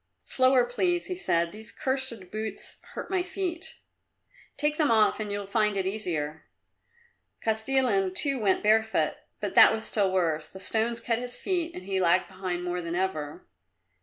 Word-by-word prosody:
"Slower, 255 -1 +4
please," 350 +8 0
he 365 - -3
said, 170 - 0
"these 215 +2 -9
cursed 260 -8 -3
boots 215 0 -3
hurt - - -6
my 375 -1 +2
feet." 365 -1 -4 0.8
"Take 295 +1 0
them 305 -2 +3
off 220 -2 +4
and 210 -1 -3
you'll 205 0 -3
find 210 0 +1
it 190 - 0
easier." 165 -7 -3 1.0
Kostilin 220 -4 +1
too 275 +2 +1
went 200 -4 +1
barefoot, 220 +1 +2 0.2
but - - -3
that - - +8
was 220 0 -2
still 200 -3 +1
worse. 160 -4 0
The 190 - -9
stones 225 +4 0
cut 230 0 0
his 245 0 -4
feet 345 -3 -2
and 180 - -7
he 190 0 -1
lagged 180 +1 +3
behind 185 -2 -4
more 180 0 -2
than 170 0 -4
ever. 155 -6 -3
215 Hz, 165 wpm, -27 LUFS, 185-260 Hz, 1.0 s, that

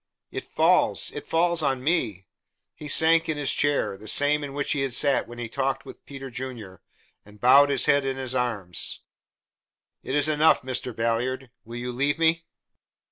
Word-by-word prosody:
It - - -6
falls - - +1
it - - -8
falls 170 0 +1
on 135 -3 -1
me!" 110 - -1 0.5
He 150 - -10
sank 160 +2 +4
in 155 - -1
his 145 -2 0
chair 145 -8 0
the 110 +2 -13
same 145 +6 +2
in 140 -1 -6
which 145 -1 -2
he 140 - 0
had 135 -2 -2
sat 140 +1 +2
when 120 - -11
he 120 -1 -5
talked 135 +3 -2
with - - -13
Peter 135 -2 -9
Junior 120 -7 -8 0.4
and 105 0 -18
bowed 140 +4 +6
his 140 -3 +2
head 140 0 +3
in 135 -1 -3
his 130 -1 -2
arms. 110 -8 -2 1.0
"It 130 - -4
is 145 +1 +3
enough, 155 -1 +3
Mr. 130 -2 -3
Ballard. 120 +3 -2
Will 115 +1 -9
you 125 +1 -4
leave 140 +4 0
me?" 165 0 +1
135 Hz, 185 wpm, -25 LUFS, 120-145 Hz, 1.0 s, bowed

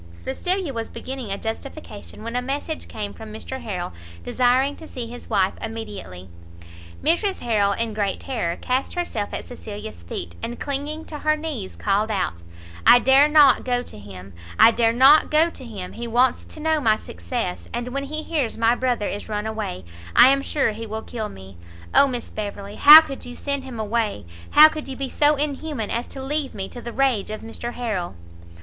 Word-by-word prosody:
Cecilia 340 - -2
was 230 -1 -4
beginning 260 -5 -6
a 195 - -2
justification, 225 -1 -7
when 230 +1 -5
a 250 - +1
message 285 +5 -4
came 205 -2 -5
from 220 -1 -10
Mr 260 +4 -7
Harrel, 180 - -4 0.3
desiring 255 - +2
to 320 - -11
see 250 -5 -6
his 240 +1 -10
wife 195 -4 +2
immediately. 210 - -7 0.8
Mrs 375 +5 +1
Harrel, 205 -4 +2
in 230 +1 -2
great 205 -2 -1
terror, 200 -11 -2
cast 255 +6 -2
herself 235 -13 -3
at - - -5
Cecilia's 205 - -8
feet, 85 0 -6
and 240 - -5
clinging 290 +3 -4
to 300 - -7
her 305 +1 +2
knees, 295 -12 -5
called 205 +2 0
out 185 - -2 0.4
"I 245 - +8
dare 265 +3 +5
not 295 -4 +6
go 245 -1 0
to 105 - -10
him! 95 -1 -11 0.2
I 230 - +8
dare 230 0 +2
not 270 +6 +6
go 320 +2 +3
to 265 - -10
him! 205 -7 -7
he 235 +1 -5
wants 245 +2 +2
to - - -12
know 315 0 +1
my 220 -4 +4
success, 85 - -5
and 240 +1 -3
when 275 +2 -3
he 310 +2 -4
hears 290 -9 -2
my 230 +1 +3
brother 245 -4 0
is 205 - -5
run 210 0 -2
away, 215 - -4 0.3
I - - +9
am 275 0 +2
sure 275 -4 0
he 225 +1 -7
will 220 +1 -5
kill 220 -3 -5
me! 95 -1 -12 0.4
Oh 280 - +7
Miss 245 -3 -4
Beverley, 205 -1 -6
how 300 +2 +11
could 275 -4 -8
you 245 - -8
send 280 0 -3
him 250 -4 -7
away? 220 - -1 0.2
how 305 +1 +9
could 310 -2 -6
you 265 - -5
be 270 0 -3
so 295 +3 +3
inhuman 290 -5 -3
as 235 +1 -2
to 270 - -8
leave 290 0 -2
me 195 -2 -4
to 245 - -9
the 235 - -6
rage 255 -6 +1
of 215 0 -5
Mr 235 +1 -6
Harrel?" 210 - -3
240 Hz, 195 wpm, -23 LUFS, 210-275 Hz, 0.8 s, how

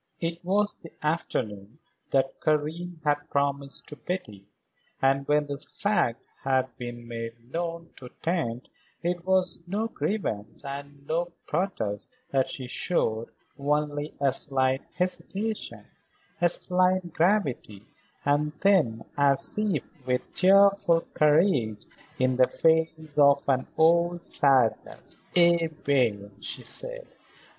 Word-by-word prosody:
It 170 +1 -3
was 205 +3 +1
the 165 - -12
afternoon 115 -8 -2 0.3
that 135 -1 0
Karen 160 +3 -1
had 145 0 0
promised 140 -1 -1
to 150 - -7
Betty, 110 - -6 0.5
and 135 +1 +2
when 150 0 +3
this 145 +1 -6
fact 205 - +1 0.2
had 130 -2 +1
been 120 -1 -7
made 115 +1 -7
known 170 0 -4
to 125 - -10
Tante 145 -8 -2 0.3
it 175 0 -1
was 185 -2 +2
no 210 +5 -1
grievance 145 - -3
and 140 0 -8
no 170 +3 -1
protest 150 - -2 0.2
that 135 -1 +2
she 130 - -5
showed, 115 -4 -1 0.3
only 145 +1 -1
a 140 -2 +2
slight 130 -1 0
hesitation, 200 +4 -3 0.6
a 175 - +5
slight 180 -1 +1
gravity, 160 - 0 0.4
and 145 +1 +2
then, 155 - +3
as 140 -1 +4
if 210 -9 -1 0.2
with 125 0 -1
cheerful 195 -2 +5
courage 150 - +3 0.3
in 130 0 +1
the 130 -1 +5
face 160 -2 +1
of 140 -1 +5
an 130 -1 +1
old 170 +2 +3
sadness: 130 -5 +2 0.2
"Eh 170 -1 +5
bien," 125 -10 0
she - - -4
said. - - 0
150 Hz, 120 wpm, -27 LUFS, 130-175 Hz, 0.6 s, a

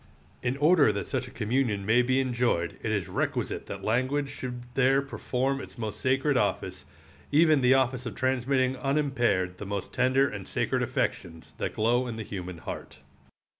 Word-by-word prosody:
In 125 +2 -1
order 150 -4 +5
that 100 -1 -3
such 125 - -3
a - - -9
communion 115 -3 -1
may 115 +4 +4
be 130 +2 +2
enjoyed 120 -10 0
it 110 - -2
is 100 -5 -1
requisite 90 - -2
that - - -7
language 130 +5 0
should 125 -1 -6
there 135 +1 +4
perform 135 -1 -2
its - - -11
most 110 -3 -5
sacred 135 +2 +2
office, - - -1 0.5
even 155 -1 +5
the 130 +1 +5
office 130 -1 +1
of 105 - -6
transmitting 130 0 +1
unimpared 120 -11 0
the 105 - -5
most 100 -1 -4
tender 130 +2 +3
and 100 -7 -7
sacred - - 0
affections 80 -2 -3
that - - -3
glow 120 +3 +2
in 115 - -4
the 110 - -5
human 90 -4 -6
heart. - - -7
125 Hz, 170 wpm, -28 LUFS, 110-135 Hz, 0.5 s, order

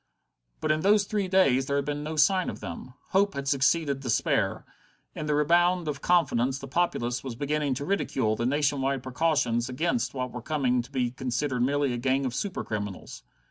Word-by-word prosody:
But - - +1
in 155 - +1
those 200 +4 +4
three 200 -1 -2
days 140 -9 +3
there 140 - 0
had 140 -1 0
been 145 0 -3
no 155 +1 -4
sign 185 +5 +3
of - - -7
them. 105 +7 -8
Hope 200 +1 +2
had 140 0 -4
succeeded 140 +1 +2
despair; 125 -4 0 0.5
in 155 - -5
the 150 - +1
rebound 175 +3 +3
of 140 -2 -3
confidence 135 -7 +2
the 135 - -8
populace 125 -6 -1
was 130 -3 -5
beginning 145 +1 -1
to 140 - -4
ridicule 130 - 0
the 120 +2 -1
nation 145 0 +1
wide 135 -1 -1
precautions 130 -4 0
against 170 - -1
what 125 -1 -3
were 125 - -6
coming 125 -3 0
to 120 - -13
be 125 -3 -1
considered 130 +1 -2
merely 140 +1 +1
a - - -2
gang 135 +2 +1
of 125 - -2
super 185 +9 -3
criminals. 105 -3 -5
140 Hz, 195 wpm, -27 LUFS, 125-155 Hz, 0.5 s, those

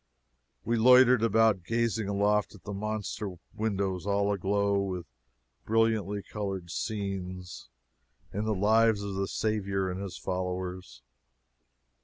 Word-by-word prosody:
We 115 - +1
loitered 125 +1 +7
about 115 -4 +3
gazing 115 0 0
aloft 105 +1 +1
at 105 - -16
the 105 - -6
monster 105 -1 -4 0.2
windows 100 -3 -2
all 100 0 +2
aglow 100 +1 +1
with 90 -3 -3 0.6
brilliantly 110 -3 +1
colored 95 -5 -5
scenes 95 -4 -4 0.6
in 105 +2 -2
the 110 -1 0
lives 110 +1 +3
of 100 -1 -4
the 95 0 -1
Saviour 100 -4 -1
and 90 +2 -5
his 100 -2 -6
followers. 90 -3 -4
100 Hz, 120 wpm, -29 LUFS, 95-110 Hz, 0.6 s, loitered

